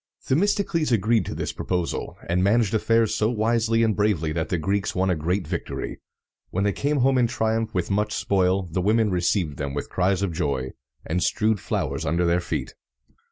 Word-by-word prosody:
Themistocles 170 Hz, -1 st, +1 dB
agreed 115 Hz, 0 st, +2 dB
to -, -, -4 dB
this -, -, -3 dB
proposal, 90 Hz, -2 st, -3 dB
and 90 Hz, +2 st, +1 dB
managed 110 Hz, +1 st, +2 dB
affairs 115 Hz, 0 st, +2 dB
so 110 Hz, -, +1 dB
wisely 115 Hz, 0 st, +1 dB
and 110 Hz, -2 st, +2 dB
bravely 100 Hz, -7 st, +1 dB
that 80 Hz, +1 st, -2 dB
the 90 Hz, -, 0 dB
Greeks 95 Hz, +5 st, -1 dB
won 95 Hz, +1 st, +2 dB
a -, -, +2 dB
great 90 Hz, +4 st, -1 dB
victory. -, -, -4 dB, 0.5 s
When 95 Hz, -, -1 dB
they 100 Hz, -1 st, +1 dB
came 145 Hz, -1 st, 0 dB
home 130 Hz, 0 st, +3 dB
in 120 Hz, -, +3 dB
triumph 110 Hz, 0 st, -1 dB
with 90 Hz, +1 st, -1 dB
much 105 Hz, +2 st, +1 dB
spoil, 95 Hz, 0 st, +1 dB
the 90 Hz, +1 st, -3 dB
women 110 Hz, +2 st, +2 dB
received 90 Hz, -4 st, 0 dB
them 70 Hz, -1 st, -4 dB
with 70 Hz, -, -4 dB
cries 95 Hz, +1 st, +1 dB
of 95 Hz, -4 st, -1 dB
joy, 65 Hz, -4 st, -2 dB, 0.3 s
and 90 Hz, +3 st, -1 dB
strewed 110 Hz, +2 st, +1 dB
flowers -, -, -2 dB
under 85 Hz, +4 st, +1 dB
their 85 Hz, +1 st, +2 dB
feet. -, -, -4 dB
100 Hz, 190 wpm, -24 LUFS, 90-115 Hz, 0.5 s, home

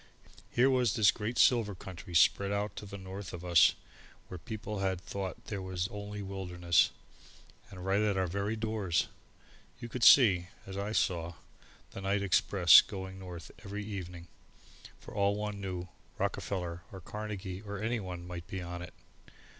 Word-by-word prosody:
Here 125 Hz, +2 st, +4 dB
was 125 Hz, -5 st, +2 dB
this 105 Hz, -4 st, +6 dB
great 110 Hz, +3 st, -4 dB
silver 115 Hz, -5 st, +4 dB
country 90 Hz, -1 st, -9 dB
spread 100 Hz, +3 st, +4 dB
out 100 Hz, +1 st, -2 dB
to 100 Hz, -1 st, -7 dB
north 95 Hz, 0 st, -8 dB
of 90 Hz, 0 st, -7 dB
us, 85 Hz, -6 st, +6 dB, 0.5 s
where 90 Hz, -, -7 dB
people 105 Hz, +3 st, -5 dB
had 95 Hz, -2 st, 0 dB
thought 95 Hz, 0 st, -6 dB
there 100 Hz, -3 st, -4 dB
was 95 Hz, -1 st, -2 dB
only 105 Hz, 0 st, -6 dB
a -, -, -6 dB
wilderness. 90 Hz, -3 st, +1 dB, 0.8 s
And 90 Hz, -2 st, -9 dB
right 100 Hz, +2 st, +2 dB
at 105 Hz, -2 st, +1 dB
our 95 Hz, -, +2 dB
very 100 Hz, +5 st, -2 dB
doors! 110 Hz, -5 st, 0 dB, 0.7 s
You 120 Hz, -1 st, -7 dB
could 125 Hz, 0 st, -4 dB
see, 95 Hz, -10 st, +7 dB, 0.2 s
as 95 Hz, -, -8 dB
I 100 Hz, +2 st, -3 dB
saw, 85 Hz, -5 st, 0 dB, 0.6 s
the 95 Hz, -, -7 dB
night 100 Hz, +1 st, 0 dB
express 95 Hz, -2 st, +7 dB
going 95 Hz, -1 st, -7 dB
north 90 Hz, -4 st, -9 dB
every 100 Hz, +1 st, -5 dB
evening; 90 Hz, -4 st, -7 dB, 0.7 s
for -, -, -12 dB
all 100 Hz, 0 st, +2 dB
one 105 Hz, -1 st, -4 dB
knew 90 Hz, -2 st, -4 dB, 0.3 s
Rockefeller 90 Hz, -3 st, -2 dB
or 95 Hz, -, -8 dB
Carnegie 100 Hz, -1 st, -6 dB
or 100 Hz, -1 st, -6 dB
anyone 95 Hz, -5 st, -3 dB
might 90 Hz, -1 st, -7 dB
be 95 Hz, -, -5 dB
on 85 Hz, 0 st, -6 dB
it! 90 Hz, 0 st, -9 dB
95 Hz, 160 wpm, -31 LUFS, 90-105 Hz, 0.8 s, see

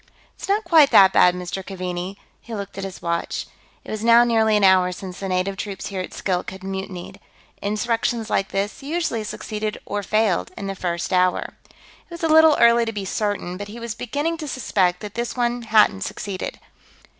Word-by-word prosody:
"It's -, -, -9 dB
not 415 Hz, +2 st, +2 dB
quite 320 Hz, -6 st, +6 dB
that 190 Hz, -1 st, +7 dB
bad, 180 Hz, 0 st, +5 dB
Mr. 180 Hz, +1 st, -5 dB
Keaveney." 185 Hz, 0 st, -5 dB, 0.2 s
He 230 Hz, -, -7 dB
looked 200 Hz, -1 st, -6 dB
at 195 Hz, -, -5 dB
his 190 Hz, -1 st, -7 dB
watch. 170 Hz, 0 st, -2 dB, 0.4 s
It -, -, -9 dB
was 215 Hz, 0 st, -4 dB
now 235 Hz, +1 st, +7 dB
nearly 220 Hz, -2 st, +3 dB
an 205 Hz, -, +1 dB
hour 185 Hz, -1 st, +5 dB
since 180 Hz, 0 st, -8 dB
the 195 Hz, -, -4 dB
native 185 Hz, +1 st, -1 dB
troops 195 Hz, -1 st, -5 dB
here 190 Hz, -, -2 dB
at 185 Hz, -, -7 dB
Skilk 180 Hz, -2 st, -2 dB
had 190 Hz, 0 st, -11 dB
mutinied. 190 Hz, -1 st, -6 dB, 0.4 s
Insurrections 225 Hz, +2 st, -1 dB
like 195 Hz, -, 0 dB
this 200 Hz, +5 st, -3 dB
usually 290 Hz, -6 st, -2 dB
succeeded 215 Hz, 0 st, -4 dB
or 205 Hz, 0 st, -3 dB
failed 210 Hz, -2 st, +1 dB
in 200 Hz, -, -5 dB
the 195 Hz, -, -3 dB
first 175 Hz, -1 st, -3 dB
hour. 180 Hz, 0 st, +1 dB, 0.2 s
It -, -, -26 dB
was 340 Hz, -1 st, -9 dB
a -, -, +3 dB
little 315 Hz, -1 st, +6 dB
early 235 Hz, 0 st, +5 dB
to 225 Hz, -, -2 dB
be 205 Hz, -3 st, -5 dB
certain, 200 Hz, -3 st, -2 dB
but 205 Hz, +1 st, -6 dB
he 220 Hz, +3 st, -9 dB
was 235 Hz, -1 st, -4 dB
beginning 290 Hz, +9 st, -2 dB
to 310 Hz, -2 st, -6 dB
suspect 185 Hz, -9 st, 0 dB
that 210 Hz, -2 st, -7 dB
this 235 Hz, +1 st, -3 dB
one 240 Hz, 0 st, 0 dB
hadn't 215 Hz, -, +3 dB
succeeded. 195 Hz, -, -5 dB
205 Hz, 200 wpm, -22 LUFS, 185-235 Hz, 0.4 s, that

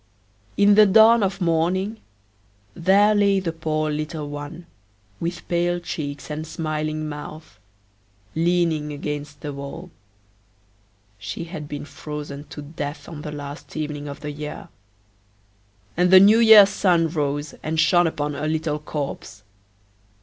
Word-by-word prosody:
In 205 Hz, 0 st, +6 dB
the 210 Hz, 0 st, +7 dB
dawn 220 Hz, +3 st, +6 dB
of 195 Hz, 0 st, -1 dB
morning 180 Hz, +6 st, 0 dB, 0.7 s
there 200 Hz, -, +4 dB
lay 200 Hz, -1 st, +3 dB
the 180 Hz, -3 st, -2 dB
poor 155 Hz, -1 st, -2 dB
little 155 Hz, 0 st, -4 dB
one, 145 Hz, +4 st, -8 dB, 0.5 s
with 170 Hz, +1 st, -5 dB
pale 175 Hz, 0 st, 0 dB
cheeks 145 Hz, -3 st, -6 dB
and 155 Hz, +1 st, -5 dB
smiling 155 Hz, -1 st, -3 dB
mouth, 150 Hz, -5 st, -9 dB, 0.7 s
leaning 165 Hz, -2 st, +1 dB
against 145 Hz, 0 st, -6 dB
the 145 Hz, -1 st, -5 dB
wall; 140 Hz, +6 st, -8 dB, 1.3 s
she 95 Hz, +10 st, -5 dB
had 160 Hz, -3 st, -7 dB
been 145 Hz, 0 st, -6 dB
frozen 150 Hz, -1 st, -7 dB
to 150 Hz, -, -9 dB
death 145 Hz, 0 st, -6 dB
on 155 Hz, -3 st, -8 dB
the 150 Hz, -, -6 dB
last 145 Hz, +1 st, -8 dB
evening 150 Hz, -1 st, -4 dB
of 140 Hz, -, -8 dB
the 150 Hz, -, -5 dB
year; 150 Hz, +1 st, -7 dB, 1.3 s
and 180 Hz, +1 st, +3 dB
the 185 Hz, 0 st, +9 dB
New 210 Hz, +4 st, +6 dB
year's 220 Hz, -3 st, +9 dB
sun 175 Hz, -5 st, +2 dB
rose 145 Hz, -2 st, -2 dB
and 160 Hz, +1 st, -2 dB
shone 175 Hz, +1 st, +4 dB
upon 150 Hz, -2 st, -3 dB
a 150 Hz, +2 st, -3 dB
little 155 Hz, -1 st, -1 dB
corpse! 140 Hz, -8 st, -6 dB
155 Hz, 135 wpm, -23 LUFS, 150-175 Hz, 1.3 s, the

